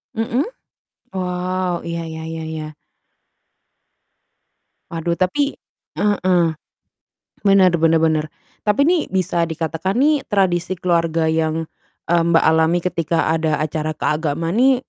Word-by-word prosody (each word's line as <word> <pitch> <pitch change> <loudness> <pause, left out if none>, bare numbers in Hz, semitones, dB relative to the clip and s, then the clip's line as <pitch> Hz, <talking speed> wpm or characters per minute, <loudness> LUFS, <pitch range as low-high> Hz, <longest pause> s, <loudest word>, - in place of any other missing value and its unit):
Mhm. 230 +5 0 0.7
Wow, 180 -1 -2
iya 170 0 -3
iya 160 0 -7
iya 160 0 -5
iya. 155 -1 -6 2.2
Waduh 170 +1 -1
tapi 280 +11 +1 0.4
heeh. 185 -4 +2 1.0
Bener 195 -3 +5
bener 165 0 +3
bener. 160 -1 +1 0.4
Tapi 215 +8 +2
nih 345 -2 +3
bisa 180 -2 0
dikatakan 165 +5 -2
nih 290 +1 +3
tradisi 185 -2 +1
keluarga 165 -2 +1
yang, 160 0 0 0.4
eee, 170 0 +3
Mbak 165 0 +4
alami 160 +2 +3
ketika 170 -2 -1
ada 155 -2 0
acara 155 0 -2
keagamaan 160 +2 -1
nih 260 +4 +5
170 Hz, 115 wpm, -20 LUFS, 160-185 Hz, 2.2 s, Bener